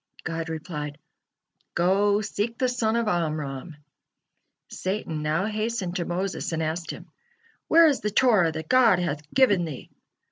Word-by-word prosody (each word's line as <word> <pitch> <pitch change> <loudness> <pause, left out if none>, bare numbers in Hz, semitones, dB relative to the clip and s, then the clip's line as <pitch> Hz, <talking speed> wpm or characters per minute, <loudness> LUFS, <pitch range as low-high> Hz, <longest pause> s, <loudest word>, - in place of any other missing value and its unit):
God 165 0 -4
replied: 150 -2 -5 0.8
"Go, 200 +4 +3
seek 215 +3 -3
the 255 - +1
son 230 -3 0
of 235 -1 0
Amram." 155 -4 -2 1.0
Satan 185 -5 -3
now 155 +5 0
hastened 215 -4 -2
to 175 - -2
Moses 185 +2 -3
and 160 0 -1
asked 160 +2 -3
him: - - -8 0.6
"Where 330 +1 +7
is 290 -5 +3
the 210 - -1
Torah 210 -6 +4
that 160 0 -6
God 255 -7 +5
hath 150 -4 -3
given 215 -9 +4
thee?" 155 -6 -7
180 Hz, 145 wpm, -25 LUFS, 160-215 Hz, 1.0 s, Where